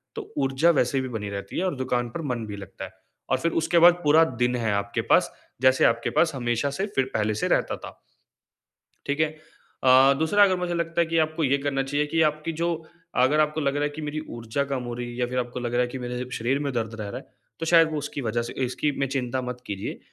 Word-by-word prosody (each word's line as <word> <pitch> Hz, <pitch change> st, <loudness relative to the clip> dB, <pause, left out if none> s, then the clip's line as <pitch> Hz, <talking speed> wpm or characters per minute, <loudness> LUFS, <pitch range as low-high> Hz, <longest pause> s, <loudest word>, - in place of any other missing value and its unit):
तो -, -, -8 dB
ऊर्जा 135 Hz, +4 st, +2 dB
वैसे 135 Hz, -2 st, +1 dB
भी 130 Hz, -, -4 dB
बनी 105 Hz, -1 st, -5 dB
रहती 100 Hz, 0 st, -6 dB
है 185 Hz, -, 0 dB
और 185 Hz, -, -1 dB
दुकान 125 Hz, -2 st, -1 dB
पर 165 Hz, -, -5 dB
मन 115 Hz, -2 st, -4 dB
भी 105 Hz, -, -6 dB
लगता 95 Hz, -1 st, -8 dB
है -, -, -12 dB, 0.4 s
और 130 Hz, -, +3 dB
फिर 165 Hz, +5 st, 0 dB
उसके 170 Hz, +1 st, +3 dB
बाद 175 Hz, -, +7 dB
पूरा 155 Hz, +2 st, +6 dB, 0.2 s
दिन 125 Hz, 0 st, +2 dB
है 115 Hz, -4 st, 0 dB
आपके 100 Hz, 0 st, -1 dB
पास, -, -, +4 dB, 0.3 s
जैसे 130 Hz, 0 st, +5 dB
आपके 115 Hz, 0 st, +2 dB
पास 160 Hz, -4 st, +2 dB
हमेशा 120 Hz, +2 st, 0 dB
से 190 Hz, +8 st, -2 dB
फिर 135 Hz, -, +2 dB
पहले 110 Hz, 0 st, +1 dB
से -, -, +1 dB
रहता -, -, +1 dB
था। -, -, -11 dB, 1.1 s
ठीक 145 Hz, +2 st, -2 dB
है? 155 Hz, -, +4 dB, 0.6 s
अ, 130 Hz, +1 st, +7 dB
दूसरा 205 Hz, +6 st, +4 dB
अगर 190 Hz, -2 st, +4 dB
मुझे 175 Hz, -1 st, -2 dB
लगता 170 Hz, 0 st, 0 dB
है -, -, +2 dB
कि 165 Hz, -, 0 dB
आपको 155 Hz, +1 st, 0 dB
ये 140 Hz, 0 st, +3 dB
करना 135 Hz, -1 st, 0 dB
चाहिए 145 Hz, +2 st, 0 dB
कि 160 Hz, +2 st, +1 dB
आपकी 155 Hz, +2 st, -6 dB
जो 170 Hz, -, +2 dB, 0.5 s
अगर 150 Hz, +4 st, +3 dB
आपको 155 Hz, +1 st, +1 dB
लग 140 Hz, 0 st, 0 dB
रहा 145 Hz, -, 0 dB
है 145 Hz, -, +1 dB
कि 160 Hz, -, -6 dB
मेरी 150 Hz, 0 st, -3 dB, 0.2 s
ऊर्जा 115 Hz, +4 st, -2 dB
कम 135 Hz, -2 st, -3 dB
हो 120 Hz, -, -5 dB
रही 120 Hz, 0 st, -5 dB
है 120 Hz, -, -8 dB
या 125 Hz, -, +1 dB
फिर 125 Hz, +1 st, -2 dB
आपको 125 Hz, 0 st, -4 dB
लग 120 Hz, 0 st, -3 dB
रहा 125 Hz, -, +3 dB
है 125 Hz, -, +1 dB
कि 130 Hz, -, -6 dB
मेरे 125 Hz, +1 st, -5 dB
शरीर 130 Hz, +5 st, 0 dB
में 140 Hz, -2 st, -2 dB
दर्द 115 Hz, -1 st, -2 dB
रह 100 Hz, -, -5 dB
रहा -, -, -5 dB
है, -, -, -22 dB, 0.3 s
तो 165 Hz, -, -3 dB
शायद 165 Hz, -1 st, +5 dB
वो 155 Hz, -, -2 dB
उसकी 145 Hz, -1 st, -4 dB
वज़ह 120 Hz, 0 st, -1 dB
से 120 Hz, -, -6 dB
इसकी 135 Hz, +4 st, -1 dB
में 135 Hz, -, +1 dB
चिंता 130 Hz, -1 st, -2 dB
मत 125 Hz, 0 st, -6 dB
कीजिए, 100 Hz, -1 st, -5 dB
135 Hz, 255 wpm, -25 LUFS, 120-155 Hz, 1.1 s, बाद